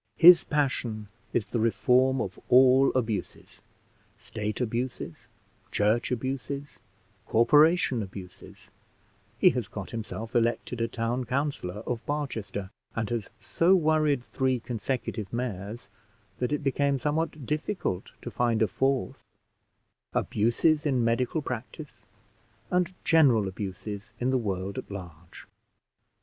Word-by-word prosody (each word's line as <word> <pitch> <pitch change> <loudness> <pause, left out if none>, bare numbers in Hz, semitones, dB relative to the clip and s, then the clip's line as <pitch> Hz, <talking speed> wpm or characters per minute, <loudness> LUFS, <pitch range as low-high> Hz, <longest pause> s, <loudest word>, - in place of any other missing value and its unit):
His 175 0 +9
passion 120 -8 -1 0.2
is 110 - 0
the 120 - 0
reform 125 +4 +3
of 95 -4 -5
all 130 +2 +6
abuses; 110 -7 -3 0.6
state 105 -1 -5
abuses, 125 +6 -2 0.6
church 105 +3 +2
abuses, 135 +3 -3 0.6
corporation 145 +2 +4
abuses 95 -2 -10 0.7
(he - - +6
has - - -3
got - - -7
himself 115 0 -6
elected 120 0 0
a 115 - +1
town 120 +2 -2
councillor 125 -7 -2
of 120 -2 -3
Barchester, 110 -10 -3 0.2
and 110 -2 -2
has 115 -3 -2
so 170 - +3
worried 155 -6 +2
three 130 0 0
consecutive 115 -3 -4
mayors, 105 -3 -4 0.5
that 125 +2 -1
it 150 - -1
became 140 0 +1
somewhat 150 +1 -2
difficult 150 - -2
to - - -5
find 115 -2 +1
a - - +3
fourth), 135 +2 -1 0.9
abuses 145 +8 +2
in 130 -5 +1
medical 125 +6 0
practice, 130 +5 -7 0.6
and 180 0 +1
general 130 -11 +5
abuses 100 +2 -6
in 125 +2 +1
the 130 - +2
world 100 -3 -3
at - - -9
large. 85 -4 -10
120 Hz, 120 wpm, -28 LUFS, 110-140 Hz, 0.9 s, His